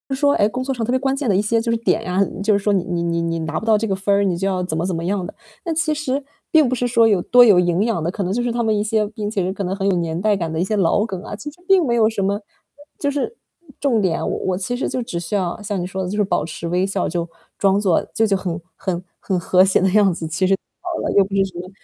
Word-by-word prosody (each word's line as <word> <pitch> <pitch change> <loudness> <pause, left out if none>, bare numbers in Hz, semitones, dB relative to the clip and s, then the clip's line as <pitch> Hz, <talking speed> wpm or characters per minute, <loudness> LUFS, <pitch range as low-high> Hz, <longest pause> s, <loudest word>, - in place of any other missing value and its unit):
说， 285 +1 +3
哎， 205 - +3
工 255 +3 -3
作 270 0 -2
上 240 - -3
特 245 - -1
别 260 - +3
关 270 0 0
键 270 -5 -2
的 190 - +3
一 200 - +3
些 225 +2 +1
就 230 0 -1
是 230 - +1
点 200 -5 +1
啊， 195 +2 +3 0.2
就 210 -1 +3
是 - - -2
说 205 - +2
你 185 - +1
你 175 -2 -2
你 170 0 0
你 165 0 -1
拿 160 -1 -2
不 220 - -8
到 215 -1 +5
这 225 +1 -2
个 195 - 0
分 195 +1 0
儿， 200 - +3
你 185 -3 +1
就 195 +3 -1
要 185 -1 -1
怎 180 -3 -3
么 160 - -1
怎 185 -3 -1
么 165 - -3
样 195 0 -1
的。 - - -8 0.3
那 335 - -1
其 315 -1 +1
实 285 -2 -2 0.3
并 310 -5 +5
不 255 - -1
是 245 0 0
说 230 -1 +4
有 200 -5 +2
多 245 +5 +6
有 205 -6 +6
营 175 +2 +2
养 220 -9 -1
的， 170 - 0
可 195 +2 -3
能 185 +2 -1
就 240 - 0
是 240 -1 -1
他 235 0 -1
们 220 -1 +2
一 205 - 0
些 215 0 +1
并 210 -2 -4
且 205 -3 -1
是 190 - -2
可 200 - -4
能 185 +1 -2
很 195 0 -1
有 195 - +3
年 165 0 -2
代 210 +1 +2
感 165 -4 -3
的 160 - -2
一 175 - +2
些 215 +3 -1
老 200 +2 +2
梗 190 -5 -5
啊， 205 - -7
其 295 +8 -7
实 350 - -22
并 380 -4 +5
没 235 - +1
有 225 -2 +4
什 210 -3 -2
么， 195 +1 +1
呃， 205 - -6 0.6
就 285 - 0
是 290 - -3 0.4
重 245 -6 +2
点 180 -4 +1
啊。 - - -3
我 - - -1
我 185 -1 -1
其 195 +6 -3
实 - - -1
就 255 - -2
只 200 -8 -4
需 190 +5 -4
要 185 +1 -2
像 205 -1 -3
你 - - -3
说 190 +1 -4
的 180 - -3
就 205 - -3
是 210 - +3
保 195 - 0
持 165 +1 -6
微 180 +2 +1
笑， 195 - -1
就 170 0 -3 0.3
装 195 0 +3
作 190 -5 +2
就 225 - +2
就 200 -2 +2
很 175 -3 -4 0.2
很 185 -2 -3 0.2
很 190 - -1
和 180 +2 +4
谐 190 - +2
的 190 - +3
样 200 -2 +4
子， 165 - -5
其 175 +4 0
实 195 - +4
就 - - -17 0.2
好 350 -2 -4
了， - - -1
又 200 - +5
不 195 +1 -5
是 195 - +4
什 190 -3 -6
么 180 - -7
200 Hz, 355 characters per minute, -20 LUFS, 180-230 Hz, 0.6 s, 多